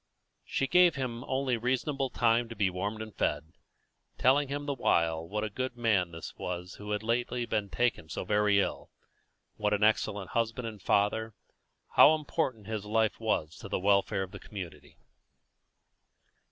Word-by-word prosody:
She 135 - -1
gave 180 +3 +5
him 125 -3 -3
only 130 -2 0
reasonable 130 +3 -1
time 115 -1 +2
to 115 - -7
be 100 -3 +1
warmed 100 +4 -3
and 110 -4 -11
fed, 80 - -1 0.6
telling 140 +3 +4
him 145 +1 -4
the 145 - -1
while 80 -9 +1
what 105 +3 -2
a 110 - -2
good 130 +3 -4
man 105 -7 +2
this 80 -1 -8
was 90 0 -5
who 105 0 -8
had 105 0 -1
lately 120 +1 -1
been 105 -3 -1
taken 120 -10 0
so - - -4
very 105 0 +3
ill, - - -2 0.7
what 105 -1 +1
an 105 - -1
excellent 105 -2 +1
husband 115 +1 -1
and 105 -3 -8
father, 105 +3 +1 0.6
how 155 - +9
important 140 -7 -2
his 110 -1 -4
life 110 +1 +1
was 85 -8 -1
to - - -9
the - - 0
welfare 100 +1 +2
of 95 - -8
the - - -9
community. 95 -5 -9
110 Hz, 165 wpm, -30 LUFS, 100-125 Hz, 0.7 s, how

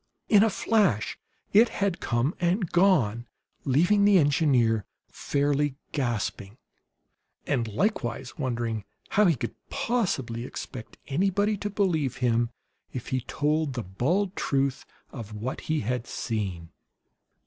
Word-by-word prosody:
In 205 -2 +7
a 225 - +5
flash 195 - +1 0.4
it 225 +3 +7
had 200 -3 -1
come 120 +6 0
and 180 +1 0
gone, 130 - +3 0.4
leaving 175 +10 +4
the 200 -1 +6
engineer 135 - +3 0.3
fairly 145 0 0 0.2
gasping 120 -6 -2 0.9
and 120 -5 0
likewise 120 - -2
wondering 120 -5 -2 0.3
how 210 - +4
he 165 - +4
could 120 - -4 0.2
possibly 135 - -1
expect 125 -1 -8
anybody 195 +7 +1
to 205 +1 -3
believe 175 - 0
him 120 -1 +1 0.4
if 125 - -6
he 130 -1 0
told 150 +3 0
the 120 -2 -3
bald 175 - 0
truth 135 -1 0 0.2
of 110 -4 -8
what 115 +5 -4
he 155 0 +1
had 120 +2 -2
seen. 95 -7 -3
135 Hz, 125 wpm, -27 LUFS, 120-185 Hz, 0.9 s, In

